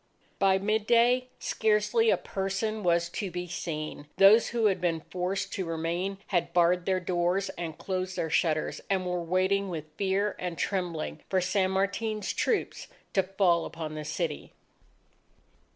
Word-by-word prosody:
By 190 -1 +4
midday, 230 +5 +3
scarcely 220 - +2
a - - +4
person 195 +3 -2
was 170 -2 +2
to 195 +2 -4
be 180 0 -4
seen. 155 -4 -5
Those 210 +4 +7
who 230 -1 0
had 195 -3 +2
been 165 -2 0
forced 190 +3 -3
to 190 - -2
remain, 170 +4 -2
had 175 -3 0
barred 175 +1 +3
their 190 -1 +2
doors 180 +2 0
and 170 -4 -6
closed 185 -1 -3
their 160 - -2
shutters, 155 -1 +1
and 190 -2 +1
were 180 -1 -1
waiting 190 +3 +1
with 155 -3 -7
fear 200 +1 0
and 180 -2 -4
trembling 180 -5 -2
for 190 - +2
San 185 +1 +1
Martin's 200 +2 -1
troops 440 - -1 0.3
to 195 - +4
fall 185 -3 +2
upon 160 -1 -6
the 155 0 -5
city. 155 0 -3
185 Hz, 150 wpm, -28 LUFS, 170-200 Hz, 0.3 s, Those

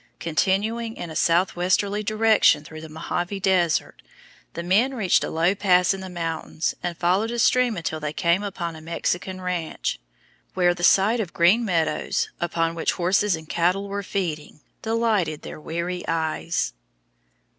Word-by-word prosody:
Continuing 210 +7 0
in 170 - -6
a - - -8
southwesterly 180 +5 +1
direction 215 -6 +3
through 155 +1 -10
the 160 - -9
Mohave 175 +5 -3
Desert, 180 -4 +1 0.5
the 170 - -4
men 220 +10 +2
reached 195 -7 +2
a - - -3
low 165 +4 +2
pass 185 -2 +3
in 195 - -6
the 190 - -7
mountains 165 -2 -3
and 175 -2 -4
followed 185 +6 +1
a 240 - -3
stream 245 -1 +3
until 160 -1 -3
they 150 -1 -3
came 170 +4 +1
upon 180 -5 -4
a 160 - -10
Mexican 175 +3 -3
ranch, 180 -3 -3 0.6
where 175 -1 +3
the 175 0 -8
sight 205 +6 +4
of 195 -6 -3
green 180 +8 +4
meadows, 165 -7 0
upon 165 -1 0
which 165 - 0
horses 190 +2 +2
and 160 -1 -10
cattle 180 +5 0
were 200 0 -3
feeding, 170 -7 -4 0.2
delighted 220 -9 0
their - - -8
weary 170 +3 -3
eyes. 160 - -1
180 Hz, 155 wpm, -24 LUFS, 165-200 Hz, 0.6 s, sight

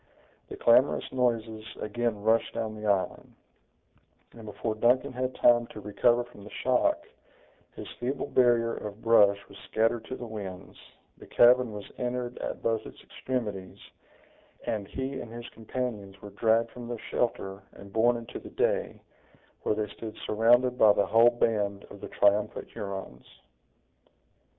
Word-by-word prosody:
The - - -7
clamorous 125 +4 +3
noises 115 -4 -1 0.2
again 110 -1 -2
rushed 115 +1 +2
down 110 -2 -2
the 105 0 -5
island; 100 -2 -1 1.0
and 115 -2 -12
before 110 +2 -3
Duncan 125 +5 +2
had 130 +1 -3
time 120 -1 +4
to - - -10
recover 120 +4 +2
from 120 -4 -15
the 105 - -10
shock, 305 - +1 0.7
his - - -8
feeble 130 +3 -2
barrier 120 -2 +3
of 105 +1 -7
brush 105 -3 +5
was 100 - -14
scattered 115 +1 0
to 130 - -5
the 120 - -7
winds, 100 -5 -8 0.4
the - - -13
cavern 125 0 +5
was 105 -1 -7
entered 125 0 -3
at - - -5
both 115 -1 0
its - - -13
extremities, 105 -8 -4 0.9
and 105 -3 -2
he 130 +4 -4
and 115 - -9
his 120 0 -8
companions 110 -4 -5
were 105 - -10
dragged 115 +2 +2
from 120 -1 -9
their 120 0 -4
shelter 95 -5 -2
and 100 0 -13
borne 120 +2 +3
into 115 -1 -8
the - - -11
day, - - -1 0.6
where - - 0
they 105 0 -1
stood 110 +1 -8
surrounded 120 +3 +3
by 105 -2 +7
the 100 - +2
whole 115 +1 +6
band 105 -4 0
of 100 - -11
the - - -6
triumphant 105 +1 +1
Hurons. 95 -11 -7
115 Hz, 155 wpm, -28 LUFS, 105-120 Hz, 1.0 s, by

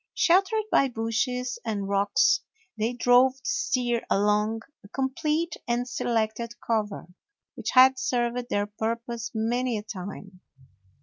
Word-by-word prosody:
Sheltered 390 +5 +3
by 275 - +4
bushes 250 +2 -2
and 205 -3 -3
rocks, 200 0 +3 0.3
they 225 +3 -1
drove 245 +1 +4
the 265 - -24
steer 255 - 0
along 210 +2 +1 0.2
a - - -13
complete 300 +7 -1
and 240 +1 0
selected 230 -1 -2
cover, 215 -3 -2 0.5
which - - -5
had 260 0 +7
served 240 -1 -1
their 205 0 0
purpose 230 +2 -4
many 240 +2 0
a 210 - -5
time. 195 -2 -8
235 Hz, 125 wpm, -26 LUFS, 215-255 Hz, 0.5 s, had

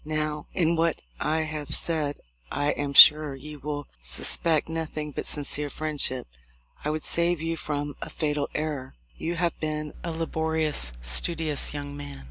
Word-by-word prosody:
"Now, 155 -1 -3
in 170 -2 +1
what 165 0 +1 0.2
I 160 +1 0
have 150 -2 -5
said 155 -4 -1 0.3
I 145 +1 0
am 145 -1 -3
sure 150 0 +9
you 150 +2 -10
will 145 0 -5
sus - - +6
pect 160 -3 +1
nothing 155 -2 -4
but - - -5
sincere 145 0 +1
friendship. 145 -4 -2 0.6
I 150 - -1
would 155 0 -3
save 170 0 +1
you 165 +1 -2
from 145 -2 -4
a - - -5
fatal 150 -2 -2
error. 145 - -4 0.2
You 170 +2 -3
have 170 -1 0
been 150 -1 -3
a 170 - -3
laborious, 160 - -1
studious 150 - +2
young 145 0 -6
man. 145 -1 -8
150 Hz, 160 wpm, -26 LUFS, 145-160 Hz, 0.6 s, sure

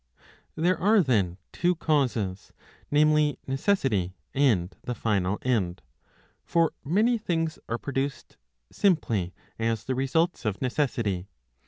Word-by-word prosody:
^^ - - -30 0.3
There 175 +4 +1
are 205 +1 +5
then 100 - +1
two 180 0 +1
causes, 125 - -1 0.4
namely, 150 -1 +3
necessity 135 - 0 0.2
and 110 -10 +2
the 125 - -3
final 105 -3 0
end. 95 - 0 0.6
For 165 -1 +2
many 220 - +2
things 165 -6 -1
are 115 - 0
produced, 135 +1 -4 0.3
simply 115 - +1 0.3
as 115 -1 0
the 130 - -2
results 150 +7 0
of 105 -4 -2
necessity. 120 -8 -1
135 Hz, 120 wpm, -27 LUFS, 105-160 Hz, 0.6 s, are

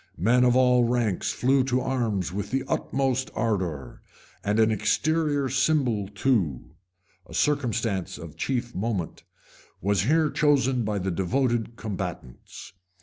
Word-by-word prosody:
[] - - -34
Men 120 +8 +3
of 125 -1 +4
all 125 -1 +4
ranks 115 -5 0
flew 130 +1 +2
to 130 -1 +1
arms 115 -9 -1
with 100 +1 -4
the 135 0 -1
utmost 130 -1 -1
ardor; 90 - -2 0.4
and 105 +2 0
an 110 0 +4
exterior 145 +5 +1
symbol 130 -6 +1
too 95 - -1 0.6
a - - -10
circumstance 115 -10 0
of 80 -2 -10
chief 125 -2 -2
moment, 95 -4 -3 0.6
was 100 0 +1
here 155 +3 +2
chosen 135 -4 +2
by 105 -1 -1
the 95 0 -2
devoted 115 +5 0
combatants. 90 - -7
120 Hz, 135 wpm, -26 LUFS, 100-130 Hz, 0.6 s, of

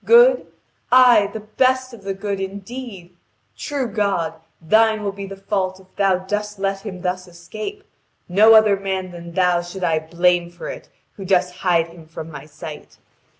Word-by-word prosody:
Good? - - +6 0.4
Aye, 245 -5 +6
the 220 - -6
best 255 +4 +1
of 230 - -11
the 195 0 -3
good, 200 0 -3
indeed! 195 -1 -7 0.4
True 265 - -3
God, 200 -6 -1 0.3
Thine 220 +5 +3
will 200 - -1
be 200 0 -7
the 195 - -8
fault 195 -1 -2
if 190 0 -22
Thou 195 -2 +3
dost 210 +1 -3
let 195 0 -2
him 185 -4 -7
thus 180 0 -2
escape. 215 - -8 0.4
No 215 +5 +6
other 215 -2 +6
man 190 -1 -3
than 170 -1 -10
Thou 180 -1 +2
should 175 +2 -8
I 165 -2 +2
blame 175 +2 +1
for 175 0 -8
it - - -9 0.3
who 195 - -7
dost 180 -1 +1
hide 170 -3 +1
him 165 -1 -14
from 160 0 -8
my 145 -1 -9
sight. 155 0 -10
195 Hz, 175 wpm, -21 LUFS, 175-210 Hz, 0.4 s, Good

